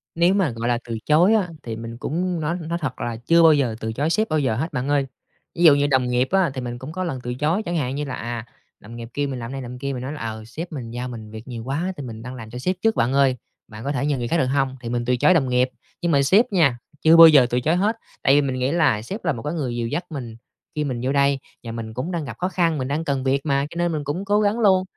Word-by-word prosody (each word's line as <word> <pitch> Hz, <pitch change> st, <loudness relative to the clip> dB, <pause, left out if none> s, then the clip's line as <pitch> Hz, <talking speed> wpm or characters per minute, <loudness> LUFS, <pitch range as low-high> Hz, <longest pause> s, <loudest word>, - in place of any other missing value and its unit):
Nếu 170 Hz, +3 st, +4 dB
mà, 195 Hz, -7 st, +2 dB
gọi 115 Hz, +1 st, -4 dB
là, 120 Hz, -, +2 dB
từ 115 Hz, -, -3 dB
chối 170 Hz, +8 st, +5 dB
á, 200 Hz, -5 st, +2 dB
thì 115 Hz, -2 st, -5 dB
mình 115 Hz, +1 st, -7 dB
cũng 175 Hz, +6 st, -2 dB
nói 160 Hz, +3 st, -1 dB
nói 170 Hz, -, -1 dB
thật 130 Hz, -4 st, -3 dB
là 120 Hz, -, -2 dB
chưa 165 Hz, +8 st, +4 dB
bao 160 Hz, -, +8 dB
giờ 130 Hz, -6 st, +1 dB
từ 110 Hz, -1 st, -3 dB
chối 145 Hz, +6 st, 0 dB
sếp 215 Hz, +4 st, +1 dB
bao 155 Hz, -, +1 dB
giờ 130 Hz, -6 st, 0 dB
hết 160 Hz, +8 st, -3 dB
bạn 125 Hz, +2 st, -2 dB
ơi. 140 Hz, -2 st, +2 dB, 0.5 s
Ví 170 Hz, -, -1 dB
dụ 155 Hz, -4 st, +8 dB
như 145 Hz, 0 st, +2 dB
đồng 130 Hz, -2 st, +2 dB
nghiệp 125 Hz, +1 st, +1 dB
á 190 Hz, -5 st, +3 dB
thì 130 Hz, -, -4 dB
mình 120 Hz, -1 st, -5 dB
cũng 130 Hz, +4 st, -7 dB
có 185 Hz, +3 st, -3 dB
lần 160 Hz, -8 st, -3 dB
từ 125 Hz, -, -3 dB
chối, 155 Hz, -, 0 dB
chẳng 175 Hz, -2 st, -2 dB
hạn 135 Hz, -3 st, -1 dB
như 145 Hz, +1 st, -2 dB
là, 130 Hz, -, -4 dB
à, 120 Hz, -2 st, -5 dB, 0.3 s
đồng 115 Hz, +2 st, -11 dB
nghiệp 115 Hz, 0 st, -7 dB
kêu 145 Hz, 0 st, -1 dB
mình 130 Hz, -2 st, -4 dB
làm 115 Hz, +1 st, -6 dB
này 135 Hz, 0 st, -5 dB
làm 125 Hz, 0 st, -7 dB
kia, 140 Hz, 0 st, -3 dB
mình 125 Hz, -, -5 dB
nói 135 Hz, +3 st, -4 dB
là, 150 Hz, -, -8 dB
ờ, 110 Hz, -1 st, -5 dB
sếp 165 Hz, +10 st, -7 dB
mình 125 Hz, -7 st, -6 dB
giao 120 Hz, +1 st, -4 dB
mình 110 Hz, -3 st, -8 dB
việc 110 Hz, +2 st, -9 dB
nhiều 120 Hz, -3 st, -6 dB
quá 160 Hz, +9 st, -2 dB
thì 145 Hz, -, -6 dB
mình 115 Hz, -3 st, -7 dB
đang 125 Hz, +2 st, -7 dB
làm 110 Hz, -2 st, -9 dB
cho 125 Hz, -, -7 dB
sếp 185 Hz, +8 st, 0 dB
trước 225 Hz, 0 st, +2 dB
bạn 120 Hz, +3 st, +1 dB
ơi, 135 Hz, -2 st, +3 dB, 0.3 s
bạn 110 Hz, +1 st, -10 dB
có 140 Hz, -, -1 dB
thể 140 Hz, -1 st, -1 dB
nhờ 145 Hz, -3 st, +1 dB
người 120 Hz, -, -3 dB
khác 170 Hz, -, +1 dB
được 150 Hz, -, +2 dB
hông? 135 Hz, 0 st, 0 dB
Thì 115 Hz, -, -5 dB
mình 120 Hz, 0 st, -1 dB
từ 125 Hz, -, +2 dB
chối 185 Hz, -, +5 dB
đồng 135 Hz, -7 st, +2 dB
nghiệp, 125 Hz, +1 st, +2 dB, 0.3 s
nhưng 170 Hz, -1 st, +1 dB
mà 140 Hz, -, +4 dB
sếp 200 Hz, -, +5 dB
nha, 155 Hz, -10 st, +3 dB, 0.2 s
chưa 160 Hz, +1 st, +6 dB
bao 165 Hz, -, +12 dB
giờ 145 Hz, -5 st, +7 dB
từ 125 Hz, -, +1 dB
chối 155 Hz, +7 st, +1 dB
hết, 210 Hz, +5 st, +1 dB, 0.3 s
tại 135 Hz, -, +5 dB
vì 145 Hz, -, +5 dB
mình 130 Hz, -2 st, -2 dB
nghĩ 130 Hz, +2 st, 0 dB
là 155 Hz, -10 st, +2 dB
sếp 195 Hz, -, -7 dB
là 160 Hz, -, +2 dB
một 115 Hz, -, -6 dB
cái 150 Hz, -, -3 dB
người 135 Hz, -8 st, -2 dB
dìu 115 Hz, -1 st, -2 dB
dắt 170 Hz, +8 st, -3 dB
mình 125 Hz, -8 st, -6 dB, 0.4 s
khi 150 Hz, -, 0 dB
mình 130 Hz, -5 st, -3 dB
vô 130 Hz, -, 0 dB
đây 140 Hz, -1 st, +3 dB, 0.2 s
và 115 Hz, -, -6 dB
mình 115 Hz, -1 st, -6 dB
cũng 130 Hz, +10 st, -4 dB
đang 165 Hz, -4 st, -3 dB
gặp 120 Hz, -, -8 dB
khó 180 Hz, -, -1 dB
khăn, 170 Hz, -4 st, +1 dB
mình 130 Hz, -2 st, -2 dB
đang 150 Hz, +3 st, -1 dB
cần 135 Hz, -2 st, -1 dB
việc 135 Hz, +2 st, 0 dB
mà 140 Hz, -1 st, +1 dB
cho 170 Hz, -, -9 dB
nên 175 Hz, 0 st, +1 dB
mình 155 Hz, -2 st, -2 dB
cũng 150 Hz, +8 st, -3 dB
cố 205 Hz, +1 st, +2 dB
gắng 210 Hz, +2 st, +1 dB
luôn. 190 Hz, -4 st, +4 dB
140 Hz, 315 wpm, -22 LUFS, 120-165 Hz, 0.5 s, bao